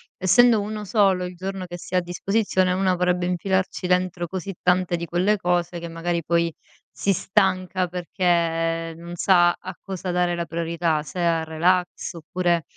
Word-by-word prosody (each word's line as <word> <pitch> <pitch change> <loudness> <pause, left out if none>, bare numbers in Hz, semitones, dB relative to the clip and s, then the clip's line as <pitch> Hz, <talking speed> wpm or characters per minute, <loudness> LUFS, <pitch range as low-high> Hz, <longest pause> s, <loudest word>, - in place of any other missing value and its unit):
essendo 225 +3 +5
1 210 0 -5
solo 195 -3 +2
il 180 0 -7
giorno 190 +1 -5
che 175 0 -7
si 180 - -6
ha - - +5
a - - +3
disposizione, 185 +1 0
una 185 0 +2
vorrebbe 180 0 +1
infilarci 185 +1 -1
dentro 180 -1 +1
così 190 +2 -5
tante 180 0 +2
di 170 0 -4
quelle 180 +5 +1
cose 175 -2 -1
che 170 0 -7
magari 170 +1 -2
poi 170 +1 +1 0.4
si 200 - -1
stanca 185 -2 +1
perché 165 -2 0
non 170 +1 -9
sa 175 -1 +4
a 185 +1 -8
cosa 185 -1 -5
dare 175 0 +1
la 170 0 -2
priorità, 165 -2 -1
se 180 - -7
al 170 -2 +2
relax 175 +3 0
oppure 170 +1 -1
180 Hz, 170 wpm, -23 LUFS, 170-185 Hz, 0.4 s, essendo